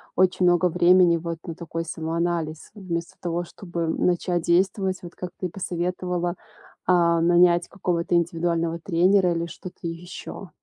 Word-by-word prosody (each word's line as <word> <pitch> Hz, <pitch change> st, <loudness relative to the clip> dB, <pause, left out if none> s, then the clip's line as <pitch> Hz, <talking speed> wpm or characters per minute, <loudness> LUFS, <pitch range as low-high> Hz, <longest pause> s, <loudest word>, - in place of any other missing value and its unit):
очень 185 Hz, 0 st, +3 dB
много 175 Hz, 0 st, +4 dB
времени 175 Hz, 0 st, +5 dB
вот 165 Hz, 0 st, -4 dB
на 165 Hz, -, -5 dB
такой 165 Hz, 0 st, -5 dB
самоанализ, 165 Hz, -1 st, -3 dB
вместо 170 Hz, -4 st, -5 dB
того, 175 Hz, 0 st, -2 dB
чтобы 170 Hz, -2 st, -5 dB
начать 175 Hz, +1 st, 0 dB
действовать. 185 Hz, +2 st, +1 dB
Вот 175 Hz, -, -10 dB
как 180 Hz, -, -6 dB
ты 185 Hz, -, -3 dB
и -, -, -10 dB
посоветовала, 180 Hz, 0 st, -2 dB, 0.5 s
а, 170 Hz, -2 st, +4 dB
нанять 175 Hz, 0 st, +4 dB
какого-то 175 Hz, -2 st, -1 dB
индивидуального 170 Hz, -1 st, 0 dB
тренера 180 Hz, +1 st, +3 dB
или 170 Hz, 0 st, -2 dB
что-то 180 Hz, +2 st, -10 dB
ещё. 175 Hz, +2 st, -8 dB
175 Hz, 140 wpm, -24 LUFS, 170-180 Hz, 0.5 s, времени